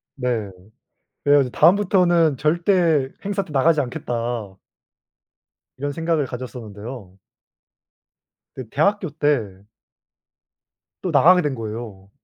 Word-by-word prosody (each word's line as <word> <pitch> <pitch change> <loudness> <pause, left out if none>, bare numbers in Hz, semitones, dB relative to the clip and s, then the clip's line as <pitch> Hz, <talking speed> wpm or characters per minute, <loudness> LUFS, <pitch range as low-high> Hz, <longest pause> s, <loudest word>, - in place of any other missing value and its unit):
네. 120 -6 -2 0.7
그래 145 0 +5
가지고 135 -3 +2
'다음부터는 175 -5 +4
절대 165 -2 +2 0.2
행사 200 -1 -2
때 165 - -13
나가지 150 +3 +3
않겠다' 125 -2 -4 1.7
이런 145 +2 -3
생각을 165 -1 0
가졌었는데요. 115 -5 -9 1.3
근데 130 -4 -9
대학교 200 - +1
때 110 -11 0 1.4
또 - - -2
나가게 180 +2 +6
된 145 -4 -2
거예요. 110 -4 -7
145 Hz, 230 characters per minute, -21 LUFS, 120-170 Hz, 1.7 s, 나가게